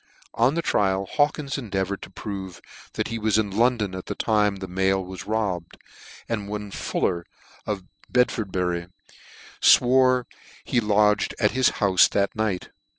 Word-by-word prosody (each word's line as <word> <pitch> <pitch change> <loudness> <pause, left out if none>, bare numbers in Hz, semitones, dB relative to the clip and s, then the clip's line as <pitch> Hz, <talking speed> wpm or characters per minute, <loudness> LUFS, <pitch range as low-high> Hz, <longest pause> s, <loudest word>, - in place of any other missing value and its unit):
On 125 +6 +2
the 170 - -1
trial, 95 -5 +1
Hawkins 145 +3 0
endeavoured 100 -4 -3
to - - -9
prove 95 -2 -7 0.3
that - - -2
he 115 - -3
was 110 -1 +2
in 105 -2 0
London 110 -2 +1
at 95 0 -7
the - - -4
time 105 -2 +1
the 95 -1 -7
mail 95 +1 0
was 95 +1 -9
robbed; 100 -6 -2 0.5
and 105 -3 -3
one 105 -1 -5
Fuller, 85 -2 -1 0.4
of 100 -3 -2 0.3
Bedfordbury, 90 -8 0 0.7
fwore 130 0 +5
that - - -20
he 120 - +4
lodged 105 -1 +2
at 105 -2 +3
his 130 0 +2
houfe 95 -3 +3
on - - +4
that 100 - 0
night. 110 -4 -2
105 Hz, 155 wpm, -24 LUFS, 95-115 Hz, 0.7 s, fwore